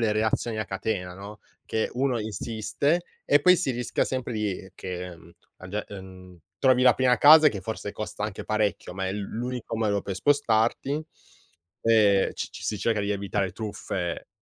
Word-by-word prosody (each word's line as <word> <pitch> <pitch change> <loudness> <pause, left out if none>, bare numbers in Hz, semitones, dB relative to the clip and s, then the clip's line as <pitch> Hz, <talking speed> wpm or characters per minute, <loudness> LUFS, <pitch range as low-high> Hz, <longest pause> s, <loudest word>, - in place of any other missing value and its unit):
le 110 -2 +2
reazioni 110 +1 0
a 110 - -1
catena, 95 -2 -3
no, 100 +2 -10 0.3
che 110 - -1
uno 130 -1 +1
insiste 110 +9 -1 0.2
e 145 - +6
poi 180 +5 +7
si 150 -7 0
rischia 120 0 -1
sempre 130 -2 -3
di 100 -3 -3
che, 90 -1 -6
mhmm, 85 +1 -17 0.3
a 95 - -10
ge 105 +2 -3
mhmm, 95 -2 -11 0.2
trovi 130 -2 +4
la 125 -2 +7
prima 125 -1 +3
casa 155 +1 +9
che, 100 -8 -5
forse, 105 +1 -5
costa 105 -1 -5
anche 105 -2 -5
parecchio, 105 -4 -1
ma 95 0 -2
è - - -2
l 105 - -4
l'unico 120 +2 -4
modo 105 -2 +1
per 100 - -4
spostarti. 140 +3 +1 0.8
Ehm 105 -4 +4
c - - -4
c - - -10
si 105 - -2
cerca 110 +1 +1
di 100 0 -2
evitare 100 -1 -2
truffe, 95 -4 -4
110 Hz, 180 wpm, -26 LUFS, 95-120 Hz, 0.8 s, casa